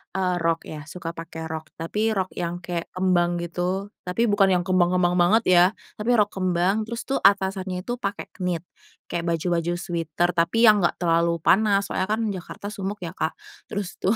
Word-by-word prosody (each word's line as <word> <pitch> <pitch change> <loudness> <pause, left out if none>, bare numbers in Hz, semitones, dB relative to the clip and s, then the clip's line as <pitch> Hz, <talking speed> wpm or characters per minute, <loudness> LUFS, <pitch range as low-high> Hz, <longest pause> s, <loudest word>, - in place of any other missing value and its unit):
eee, 185 -2 +1
rok 165 0 +1
ya, 155 -1 -7
suka 170 -1 -5
pake 165 -1 -7
rok, 160 -1 -5
tapi 210 +7 -1
rok 190 -1 -1
yang 175 0 -3
kayak 170 -1 -3
kembang 175 -2 +2
gitu, 180 +4 -2 0.2
tapi 180 +6 0
bukan 205 -3 +4
yang 175 - +1
kembang 185 -2 +3
kembang 175 -1 +2
banget 210 +6 +4
ya, 175 0 +7 0.3
tapi 220 +4 0
rok 210 -1 +3
kembang, 185 +2 +1
terus 235 +1 -5
tuh 270 - 0
atasannya 190 -2 +2
itu 245 0 -3
pakai 200 +3 -4
knit, 180 -2 -1 0.5
kayak 170 0 -2
baju-baju 170 +1 -1
sweater 175 0 -1
tapi 175 +7 +2
yang 210 -2 +7
enggak 175 - +2
terlalu 170 -1 +2
panas 200 -1 +4
soalnya 185 - 0
kan 215 +2 +1
Jakarta 190 +2 -7
sumuk 200 +1 -4
ya 165 - -5
Kak, 160 - -2 0.3
terus 200 -3 -4
tuh 200 +5 +2
180 Hz, 185 wpm, -24 LUFS, 170-200 Hz, 0.5 s, ya